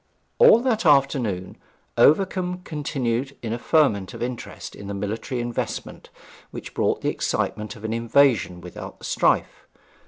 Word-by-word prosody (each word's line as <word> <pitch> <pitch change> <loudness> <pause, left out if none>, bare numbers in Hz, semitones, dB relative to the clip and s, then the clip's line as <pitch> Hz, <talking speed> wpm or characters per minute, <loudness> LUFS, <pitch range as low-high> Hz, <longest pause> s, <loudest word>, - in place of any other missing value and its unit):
All 475 - +7
that 240 -4 0
afternoon 135 - +2 0.4
Overcombe 180 +2 +2
continued 135 -4 -3
in 115 -1 -2
a 120 - -4
ferment 115 - +2
of - - -4
interest 125 -1 -6
in 100 - -9
the 100 - -4
military 110 +5 -3
investment, 120 0 -4 0.4
which - - -9
brought - - 0
the - - 0
excitement 105 0 -2
of 105 - -14
an 110 0 -2
invasion 115 -6 +2
without 90 0 -9
the - - -11
strife. - - 0
120 Hz, 145 wpm, -23 LUFS, 105-150 Hz, 0.4 s, All